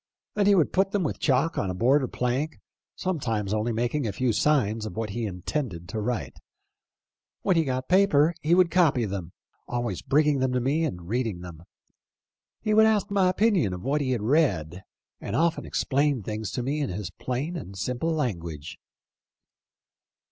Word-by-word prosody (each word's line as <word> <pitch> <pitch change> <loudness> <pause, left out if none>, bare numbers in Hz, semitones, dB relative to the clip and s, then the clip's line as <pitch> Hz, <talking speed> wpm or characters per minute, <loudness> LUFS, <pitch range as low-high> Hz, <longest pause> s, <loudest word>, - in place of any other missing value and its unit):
Then 205 -1 +2
he 205 - +6
would 165 -5 +2
put 195 +1 +2
them 200 -3 +1
with 155 - -3
chalk 145 +3 +1
on 95 - -1
a 90 - -3
board 130 +9 +3
or 130 - -1
plank, 130 +7 -2 0.4
sometimes 115 - -2
only 110 +2 0
making 120 +4 -1
a - - -1
few 125 +2 0
signs 110 -6 +1
of 110 - -9
what 110 -2 -2
he 115 +1 -2
intended 90 - -4
to 110 - -3
write. 120 +2 -3 1.0
When 190 - +3
he 165 - +4
got 130 -2 -2
paper 175 -5 +4
he 160 +3 +3
would 180 -2 +4
copy 155 -9 +3
them, 95 -4 -5 0.4
always 120 -6 -2
bringing 150 0 +2
them 130 -1 0
to 125 - +2
me 145 +6 +1
and 90 - -5
reading 115 -4 -2
them. 85 -3 -9 1.0
He 215 -1 0
would 220 +1 +6
ask 210 -2 +1
my 195 -2 +3
opinion 185 - +2
of 90 - -9
what 145 +3 0
he 135 - -1
had 120 -5 -1
read, 95 - +1 0.4
and - - -4
often 165 0 +1
explained 140 -5 0
things 110 -1 -4
to 125 - -2
me 140 +4 -1
in 140 - -1
his 95 0 -5
plain 135 +8 -4
and 100 - -7
simple 125 - -2
language." 85 - -3
130 Hz, 185 wpm, -26 LUFS, 105-160 Hz, 1.0 s, he